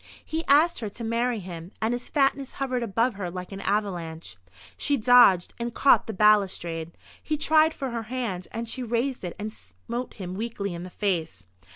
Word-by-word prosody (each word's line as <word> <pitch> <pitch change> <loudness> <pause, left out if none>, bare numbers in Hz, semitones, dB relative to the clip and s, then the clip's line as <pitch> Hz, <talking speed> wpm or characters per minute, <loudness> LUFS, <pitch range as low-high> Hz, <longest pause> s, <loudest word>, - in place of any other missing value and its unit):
He 320 +1 -3
asked 310 +5 +5
her 220 -3 -4
to 230 +4 -8
marry 235 +1 0
him, 175 -2 -8
and 220 +2 0
his 245 0 -5
fatness 275 -2 +1
hovered 255 -2 -2
above 230 +2 +1
her 195 -3 -4
like 180 +1 -7
an 195 0 -6
avalanche. 175 - -2 0.4
She 285 - 0
dodged, 235 -6 +6
and 235 0 -4
caught 275 - +5
the - - -2
balustrade. 185 -5 +2 0.2
He 305 - -2
tried 310 +1 +4
for 270 -3 -4
her 235 -1 -3
hand, 230 -8 -3
and 230 +1 -4
she 255 - -4
raised 245 +1 -1
it 175 - -5
and 215 +1 -5
smote 225 - -7
him 185 -3 -6
weakly 200 -2 -3
in 170 - -6
the 180 - -7
face. 165 - -2
220 Hz, 190 wpm, -26 LUFS, 185-250 Hz, 0.4 s, dodged